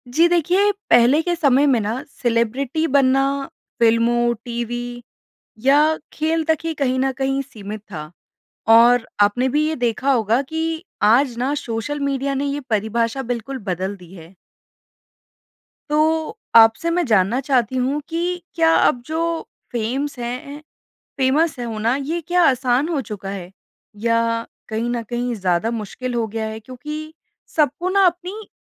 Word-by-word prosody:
जी 335 +2 +6
देखिए, 360 +4 +3 0.2
पहले 240 +6 +5
के 350 +1 -1
समय 280 -4 +3
में 260 -4 +3
ना 225 +6 -3 0.2
सेलिब्रिटी 245 +6 0
बनना, 270 -1 +3 0.6
फ़िल्मों, 235 +1 +3
टीवी 240 0 -4 0.6
या 275 +1 +6 0.4
खेल 320 +1 0
तक 320 -1 +2
ही 330 - -1
कहीं 260 -3 0
ना 265 +1 +1
कहीं 270 0 +1
सीमित 215 -6 -8
था। 155 -2 -6 0.7
और 240 +1 +5 0.2
आपने 245 +6 +2
भी 300 +4 +1
ये 315 - -2
देखा 245 +3 0
होगा 230 0 +2
कि 320 +3 -3 0.2
आज 235 +4 +4
ना 260 +3 0
सोशल 235 +6 -3
मीडिया 275 0 -1
ने 275 +1 -1
यह 285 +1 -2
परिभाषा 230 +4 0
बिल्कुल 245 +3 -5
बदल 190 +2 -2
दी 180 -2 -15
है। 170 0 -13 1.6
तो 315 +6 +1 0.2
आपसे 225 +8 +6
मैं 350 +1 +1
जानना 215 0 +2
चाहती 260 -3 +1
हूँ 265 +4 0
कि 350 +2 -2
क्या 325 -1 +4
अब 245 - +3
जो 315 +2 -3 0.5
फेमस 255 +5 -2
हैं, 255 +5 -5
ए - - -11 0.6
फ़ेमस 280 +3 +2
है 245 - -3
होना, 225 +1 -1
ये 300 +5 -3
क्या 355 0 +3
आसान 255 +2 +1
हो 320 -5 0
चुका 210 -5 -7
है? 185 -3 -7 0.5
या 230 0 +1 0.2
कहीं 225 +2 -2
ना 240 -1 -2
कहीं 240 +2 -3
ज़्यादा 185 +1 0
मुश्किल 235 +3 -5
हो 230 -1 0
गया 220 +1 -3
है, 220 0 -6
क्योंकि 300 +7 -7 0.4
सबको 300 +3 +1
ना 395 0 +4
अपनी 365 +5 -2
255 Hz, 155 wpm, -21 LUFS, 230-300 Hz, 1.6 s, जी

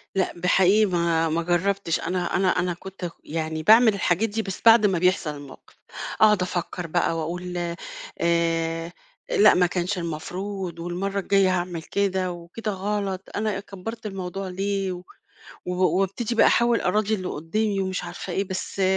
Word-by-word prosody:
لأ 190 - +1
ب 175 - -7
حقيقي 195 +4 +5
ما 170 -3 +1
ما 165 +2 0
جرّبتش، 180 0 0
أنا 180 -1 -2
أنا 190 0 +2
أنا 180 -1 0
كنت 190 +1 -11
اك 170 - -2
يعني 155 0 -3
باعمل 220 +3 +7
الحاجات 200 +2 +1
دي، 220 +2 -2
بس 195 -3 -6
بعد 225 -1 +8
ما 185 -4 +2
بيحصل 180 -3 +2
الموقِف، 145 -2 -13 0.5
اقعُد 210 -3 +6
افكّر 180 -1 -3
بقى 165 0 0
واقول 175 +2 -4 0.6
آآ، 165 0 0 0.4
لأ 440 -4 +6
ما 180 0 +4
كانش 180 +2 -1
المفروض، 180 +2 -5
والمَرّة 190 +4 -2
الجايّة 195 -1 +3
هاعمل 175 -2 -3
كده، 190 -2 0
وكده 175 +6 -5
غلط 195 -1 -3
أنا 210 -2 -1
أ - - -4
كبّرت 215 +3 -8
الموضوع 195 -1 -5
ليه، 195 +1 -2
و 180 0 -6 0.6
و 180 - -2 0.3
وابتدي 220 +5 -2
بقى - - +6
احاول 235 -1 +3
أراضي 215 +3 +1
اللي 185 -2 -5
قدّامي 200 +6 -1
ومش 185 -1 -2
عارفة - - -6
إيه، 195 - +1
بس 190 +1 -4
185 Hz, 165 wpm, -24 LUFS, 175-200 Hz, 0.6 s, بعد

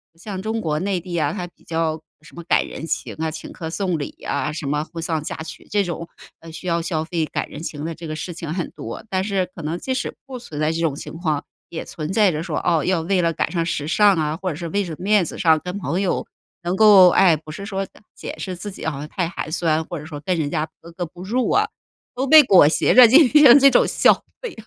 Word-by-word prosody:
像 190 +2 -7
中 220 +2 -2
国 155 -6 -1
内 190 +1 -1
地 175 0 -7
啊， 150 -3 +1
他 180 - -4
比 - - -25
较 160 -1 -2 0.2
什 155 -3 -17
么 170 - -8
赶 - - +2
人 160 - -7
情 - - -3
啊、 160 0 -2
请 160 - -8
客 160 - -6
送 180 -1 -1
礼 145 - -4 0.2
啊、 150 - -1
什 150 -1 -5
么 150 +2 0
婚 165 0 -8
丧 160 -2 -2
嫁 - - -5
娶， 160 - -10
这 205 0 +2
种， 170 -1 -5 0.4
呃， 165 0 -11
需 170 +3 -8
要 170 -1 +1
消 160 -1 -2
费、 165 -1 -1
赶 - - -4
人 150 - -9
情 150 -3 -5
的 165 - -4
这 165 +1 -9
个 155 - -4
事 175 +3 -5
情 165 -1 -5
很 175 -1 -3
多。 - - -8
但 185 0 0
是 195 -2 0
可 165 - -8
能 160 +3 -2
即 260 - -3
使 255 - -3
不 265 -2 -7
存 155 -11 -8
在 155 - +2
这 165 - -3
种 160 -4 +1
情 - - -8
况， 155 -4 -1 0.3
也 165 - -5
存 155 +2 -6
在 210 -1 +4
着 155 0 -3
说， 165 -3 -3
哦， 165 -3 +1
要 185 -2 +1
为 180 +3 +1
了 170 -1 +1
赶 - - -1
上 170 -2 -1
时 155 -3 -2
尚 205 +3 +4
啊， 155 -1 -1
或 185 +1 -3
者 155 - -4
是 170 +2 -5
为 200 +4 0
着 165 - -6
面 205 0 +3
子 - - -7
上 160 -4 +4
跟 180 +2 -5
朋 175 0 -2
友 190 - -1 0.4
能 175 +2 -1
够 200 -3 +8
哎， 175 -2 +5
不 155 0 -11
是 200 +5 -7
说， 195 -2 -3
呃， - - -20
解 - - -7
释 185 - -5
自 190 +4 -6
己 185 - -9
好 155 -4 -2
像 150 - -6
太 175 +2 -2
寒 165 - -5
酸， 160 -1 +1
或 175 - -6
者 150 - -10
说 150 -2 -8
跟 180 -2 0
人 145 -2 -1
家 155 -1 -1
格 170 - -12
格 175 +1 -4
不 175 +2 -12
入 240 +6 0
啊， - - +3 0.5
都 265 +2 -1
被 310 +2 +9
裹 190 - +6
挟 155 - +2
着 250 -1 +9
进 285 +7 +7
行 285 -3 +8
这 275 0 +6
种 - - +4
消 - - +5 0.3
费 485 -5 -5
170 Hz, 290 characters per minute, -21 LUFS, 160-195 Hz, 0.5 s, 被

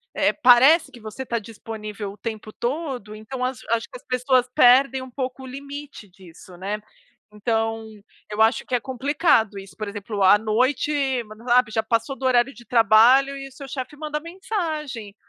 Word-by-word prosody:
eh, - - +3
parece 275 +4 +5
que 240 - -13
você 220 +5 -7
tá 235 -1 -2
disponível 215 -2 -7
o - - -17
tempo 220 -2 -6
todo, 250 -5 -4
então 250 +4 -6
acho 255 -2 -3 0.3
que - - -8
as - - -23
pessoas 255 0 +2
perdem 265 +2 +5
um 260 - -10
pouco 260 +1 -5
o - - -8
limite 280 -4 -9
disso, 180 0 -15
né, 205 +4 -4 0.5
então, 225 0 -1 0.4
eu 210 +1 -2
acho 225 +3 +2
que 250 - -1
é 245 - +2
complicado 260 - +1
isso, 195 0 -10
por 215 - -5
exemplo, 205 0 -4
à 190 +2 +7
noite, 250 +8 0 0.3
mas 215 0 -13
sabe, 245 -2 +3
já 220 - +1
passou 230 +4 -1
do 265 - -6
horário 250 +1 +3
de 240 - -15
trabalho 245 +4 +5
e 275 0 -7
o - - -15
seu 275 +1 -10
chefe 270 +2 -6
manda 300 -1 -4
mensagem. 310 - -5
245 Hz, 180 wpm, -23 LUFS, 215-275 Hz, 0.5 s, à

